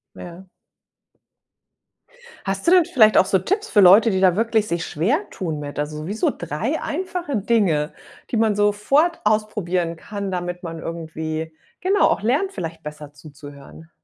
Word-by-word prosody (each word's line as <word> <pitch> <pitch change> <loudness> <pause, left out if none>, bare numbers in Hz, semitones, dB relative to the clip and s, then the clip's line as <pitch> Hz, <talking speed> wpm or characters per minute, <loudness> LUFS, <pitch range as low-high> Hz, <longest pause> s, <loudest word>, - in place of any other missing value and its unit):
Ja. 180 +2 -11 2.0
Hast 195 0 -3
du - - +5
denn 360 -1 +6
vielleicht 215 -7 +4
auch - - +5
so 190 - +2
Tipps 400 - -2
für 205 - +4
Leute, 200 +4 +7
die 190 -2 0
da 185 -2 +4
wirklich 225 -1 +1
sich 170 0 -2
schwertun 180 - -2
mit? 145 -1 -7
Also, 150 +1 -4
wie 200 - -4
so 220 - +1
3 195 - -3
einfache 350 -3 -3
Dinge, 195 -8 +1 0.4
die - - -1
man 220 -1 +2
sofort 210 +12 +2
ausprobieren 205 -5 0
kann, 200 +3 -6
damit 180 -1 -4
man 165 -2 -6
irgendwie, 160 -1 -5 0.3
genau, 390 +2 +3
auch - - -1
lernt, 285 - 0
vielleicht 165 - -6
besser 150 -1 -9
zuzuhören. 145 +1 -13
190 Hz, 155 wpm, -21 LUFS, 160-225 Hz, 2.0 s, Leute